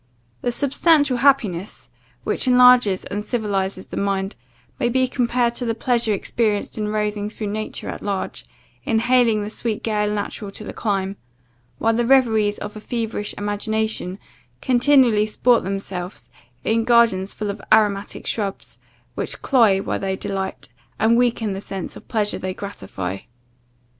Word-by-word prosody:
The 245 - 0
substantial 285 +1 +3
happiness, 225 -9 +1 0.3
which - - -1
enlarges 250 -6 +6
and 205 +1 -4
civilizes 200 -5 -2
the - - -6
mind, 195 0 -1 0.4
may 240 - +1
be 260 +1 +2
compared 245 -1 +1
to 245 - -3
the 230 -1 -1
pleasure 235 -1 +1
experienced 210 +1 -1
in 215 -1 -2
roving 210 -1 -1
through 210 -1 -5
nature 215 0 -4
at - - -5
large, 200 -2 -4 0.4
inhaling 230 -1 +2
the 210 - -5
sweet 225 -1 -3
gale 210 -2 0
natural 205 0 -4
to 215 - -6
the - - -7
clime; 195 -2 -2 0.6
while 225 +10 +2
the 240 +1 +1
reveries 220 -6 +3
of 210 0 -7
a - - -6
feverish 225 -2 -3
imagination 205 -2 -2 0.4
continually 250 -4 +4
sport 235 +2 +3
themselves 190 -1 -5 0.3
in 225 +1 +1
gardens 230 -5 +3
full 210 -1 -2
of 200 +1 -9
aromatic 210 -2 +2
shrubs, 200 -3 -4 0.3
which - - -4
cloy 215 -7 +4
while - - -2
they 190 -1 -2
delight, 190 0 -4 0.3
and 225 +1 +3
weaken 235 -4 +1
the 195 - -5
sense 195 -2 -6
of - - -13
pleasure 210 -3 0
they 185 0 -4
gratify. 95 - -5
215 Hz, 150 wpm, -22 LUFS, 200-235 Hz, 0.6 s, enlarges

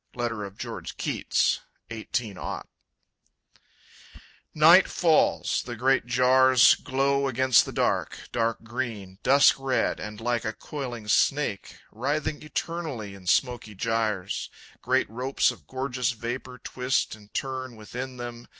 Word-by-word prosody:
Letter 120 -3 -2
of 100 0 -11
George - - -7
Keats, - - 0 0.3
18 110 -3 -4 2.2
Night 165 +5 +7
falls; 165 -4 +2
the 120 - -7
great 130 +2 +2
jars 130 0 +6
glow 140 +1 0
against 130 -1 +4
the - - -5
dark, - - 0
Dark 115 -1 -1
green, 110 -5 -5
dusk 140 +2 +5
red, 135 -1 0
and, 105 0 -7
like 120 0 -1
a 110 - -2
coiling 120 -5 -7
snake, 135 -1 +1
Writhing 145 +6 -2
eternally 150 -8 -4
in 95 -2 -13
smoky 120 0 +1
gyres, 110 -3 -1 0.3
Great - - +1
ropes 125 +5 +1
of - - -14
gorgeous 130 -1 -2
vapor 120 +2 -6
twist 125 +1 -1
and 105 -1 -14
turn 130 -2 -3
Within 125 +4 -7
them. 120 -1 -7
125 Hz, 125 wpm, -26 LUFS, 110-130 Hz, 2.2 s, Night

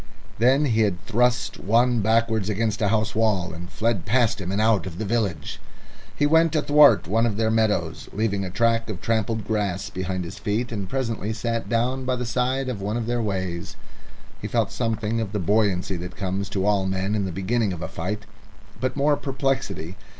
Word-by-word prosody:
Then 130 +5 +4
he 110 -5 +3 0.2
thrust 120 +2 +1
one 120 +3 +3
backwards 110 -1 +1
against 110 +1 -1
a 105 - +3
house 110 +1 +1
wall, 105 -6 +1
and 85 +1 -8
fled 105 -2 -1
past 115 0 +1
him 90 0 -3
and 100 - 0
out 110 -3 +2
of 85 -2 -7
the 110 - -3
village. 100 -8 -2 0.6
He 145 - +2
went 160 +2 +4
athwart 150 - +5
one 115 +5 +2
of 105 -3 -2
their 110 0 +1
meadows, 110 -1 0
leaving 100 -2 -1
a 95 - -4
track 115 +3 +1
of 100 -4 -4
trampled 110 0 -1
grass 100 -2 -1
behind 95 -1 -3
his 85 - -8
feet, 115 +3 -1
and 100 -4 -4
presently 115 -4 -2
sat 115 -1 -3
down 125 +3 0
by 130 0 +1
the 125 0 -3
side 130 +3 0
of 120 -6 -4
one 105 +3 -2
of 120 - -2
their 120 +1 0
ways. 95 -5 -3 0.7
He - - -3
felt - - 0
something 115 -1 -1
of 105 -2 -4
the 105 - 0
buoyancy 95 -1 +1
that 90 +2 -7
comes 95 0 -2
to 100 -1 -1
all 100 -2 +2
men 95 +2 -1
in 105 -2 0
the 95 - -3
beginning 100 +4 0
of 85 -2 -5
a - - -3
fight, 105 +5 -4 0.6
but 130 0 -1
more 145 +1 +3
perplexity. 130 - -2
110 Hz, 195 wpm, -24 LUFS, 95-115 Hz, 0.7 s, athwart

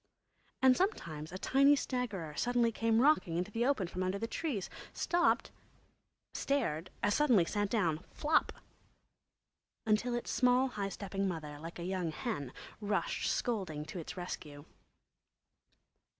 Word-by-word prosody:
And 260 -1 +7
sometimes 165 - -2
a 185 - -5
tiny 275 +7 +5
staggerer 230 - -3
came - - -13
suddenly 240 -1 +2 0.3
rocking 245 - +3
into 180 +4 -2
the 235 +3 +1
open 275 -9 +2
from 180 - -5
under 185 +1 0
the 225 - -2
trees, 230 - -2 0.3
stopped, 350 0 +2 0.8
stared, 185 - -1
as 205 - +3
suddenly 245 - +4
sat 205 +2 -1
down 175 -9 +1
"flop," 310 +1 +2 1.3
until 225 +3 +2
its 240 - -3
small 255 +1 +3
high 200 -4 -3
stepping 195 0 -3
mother, 155 -5 -5
like 165 +2 -8
a 170 - -5
young 180 -2 -1
hen, 150 - -4 0.3
rushed 210 - -1
scolding 185 - -1
to 180 - -6
its 165 - -7
rescue. 150 -5 -6
205 Hz, 135 wpm, -33 LUFS, 170-250 Hz, 1.3 s, And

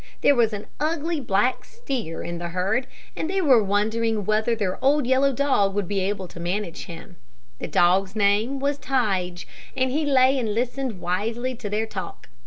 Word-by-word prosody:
There - - +6
was 235 -4 +3
an 210 -1 -5
ugly, 320 +1 -1
black 235 0 +1
steer 255 - -5
in 170 0 -5
the 175 - -4
herd, 195 +8 0 0.3
and 315 - -3
they 385 +1 0
were 265 - +5
wondering 215 +1 0
whether 215 +3 +1
their 205 +1 -3
old 285 0 +3
yellow 265 +2 +3
dog 240 -8 +1
would 205 -3 -1
be 200 +1 -1
able 190 0 -2
to 170 - -11
manage 175 +1 -3
him. 170 -3 -11 0.4
The - - -4
dog's 185 +3 +2
name 215 +6 +2
was 285 +1 -1
Tige, 190 -11 -1 0.3
and 260 0 +1
he 305 +4 0
lay 265 -1 +4
and 220 -4 -2
listened 245 -4 -2
wisely 225 +8 -2
to 230 -4 -6
their 215 +2 0
talk. 220 - -7
220 Hz, 185 wpm, -24 LUFS, 195-265 Hz, 0.4 s, There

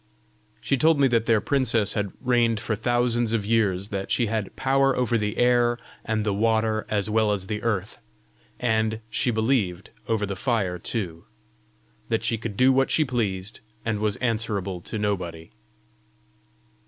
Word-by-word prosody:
She 140 - +1
told 160 +2 +4
me 140 - +5
that 115 -2 +1
their 115 -2 +4
princess 120 -4 +1
had 100 -2 -2
reigned 120 -3 +2
for 110 0 -2
thousands 120 0 +1
of 110 -3 0
years; 100 -3 +1
that 95 -1 -4
she 120 - +2
had 110 -2 -3
power 135 0 +2
over 125 -1 +1
the 105 -1 -1
air 120 -1 +3 0.3
and 110 -1 -1
the 105 - +1
water 110 +1 +1
as 105 -2 0
well 110 0 +2
as 100 -2 -1
the 105 +1 -4
earth 105 -5 -2 0.6
and, 110 -2 0
she 125 - +1
believed, 110 -6 0 0.2
over 110 -2 0
the 100 0 -4
fire 95 -5 -1
too; 85 -5 -4 0.8
that 115 - 0
she 115 - 0
could 105 -3 -5
do 130 +1 +5
what 135 0 +2
she 155 - +3
pleased, 105 -6 -2 0.3
and 110 -2 -1
was 105 -1 0
answerable 105 -6 -2
to 110 - -6
nobody. 90 -6 -3
110 Hz, 165 wpm, -25 LUFS, 100-120 Hz, 0.8 s, me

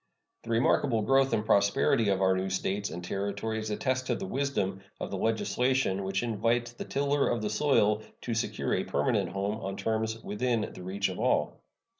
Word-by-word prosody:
The 115 - -12
remarkable 115 0 +2
growth 135 +3 +3
and 105 - 0
prosperity 100 +1 +3
of 95 -1 +1
our 95 0 +4
new 95 +1 -1
States 95 +2 -1
and 90 - -6
Territories 100 +4 -3
attest 130 +4 -1
the 195 - -1
wisdom 135 - -1 0.2
of - - -5
the 100 - -2
legislation 115 -1 +1
which 95 +3 -1
invites 115 +1 0
the 120 - -7
tiller 140 0 +1
of 115 - -1
the 105 - -1
soil 105 -4 +3 0.2
to 120 - -3
secure 115 - -1
a - - +1
permanent - - 0
home 100 +2 -2
on 95 -2 -5
terms 110 0 -1
within 115 +1 -1
the - - -10
reach 95 +2 -1
of 95 - -6
all. - - +1
110 Hz, 180 wpm, -29 LUFS, 100-120 Hz, 0.2 s, our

